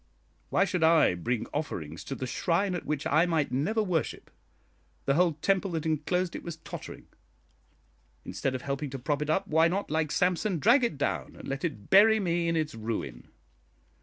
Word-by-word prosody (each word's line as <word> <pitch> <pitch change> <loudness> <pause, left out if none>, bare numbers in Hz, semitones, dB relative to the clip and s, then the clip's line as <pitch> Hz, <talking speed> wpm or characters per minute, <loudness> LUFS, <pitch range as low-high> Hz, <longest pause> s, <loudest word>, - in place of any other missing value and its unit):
Why 195 - +3
should 180 -3 -1
I 160 - +5
bring 110 +7 -2
offerings 85 - -4
to 135 - -4
the 130 - -4
shrine 180 +8 0
at 175 - -5
which 150 0 -2
I 165 +3 +3
might 160 -4 0
never 210 - 0
worship? 175 -6 -2 0.7
The 140 - +2
whole 170 +2 +3
temple 195 0 +2
that 160 -1 -2
enclosed 170 +3 -1
it - - -5
was 170 -2 -6
tottering. 160 - -9 1.2
Instead 135 -1 -2
of 125 - -5
helping 140 +1 -3
to 135 - -5
prop 145 +3 -2
it 150 - -2
up, 190 +5 +1
why 160 0 +4
not, 190 +1 -2
like 155 -1 0
Samson, 180 +1 +1
drag 235 - +4
it 235 -11 0
down 145 - -2
and - - -10
let 135 +1 -4
it 135 - -4
bury 220 +3 +7
me 170 -3 0
in 165 - +1
its 155 -2 -1
ruin? 110 0 -5
160 Hz, 190 wpm, -28 LUFS, 140-180 Hz, 1.2 s, bury